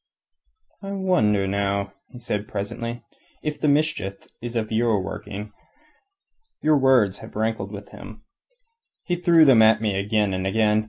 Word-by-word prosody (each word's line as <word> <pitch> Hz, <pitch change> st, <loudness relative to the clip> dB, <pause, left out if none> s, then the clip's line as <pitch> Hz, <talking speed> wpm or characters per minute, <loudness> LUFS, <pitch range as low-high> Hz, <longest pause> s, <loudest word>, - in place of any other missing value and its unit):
"I 195 Hz, 0 st, -6 dB
wonder, 110 Hz, -, +1 dB
now," 100 Hz, 0 st, -1 dB, 0.2 s
he -, -, -12 dB
said 105 Hz, -3 st, -3 dB
presently, 115 Hz, +4 st, -5 dB, 0.4 s
"if 150 Hz, -1 st, -4 dB
the -, -, +2 dB
mischief 145 Hz, -10 st, 0 dB
is 120 Hz, 0 st, -6 dB
of 110 Hz, -1 st, -2 dB
your 110 Hz, -2 st, +2 dB
working. 105 Hz, +2 st, -7 dB, 1.1 s
Your 155 Hz, -1 st, +4 dB
words 125 Hz, -8 st, +3 dB
have -, -, -12 dB
rankled 110 Hz, -2 st, -2 dB
with 100 Hz, -1 st, -9 dB
him. 110 Hz, +2 st, -12 dB, 0.8 s
He 175 Hz, -, -1 dB
threw 170 Hz, -2 st, +5 dB
them 130 Hz, -5 st, +6 dB
at 110 Hz, 0 st, +5 dB
me 105 Hz, -3 st, -1 dB
again 105 Hz, 0 st, 0 dB
and 95 Hz, +1 st, -2 dB
again. 105 Hz, +1 st, +2 dB
110 Hz, 150 wpm, -23 LUFS, 100-130 Hz, 1.1 s, them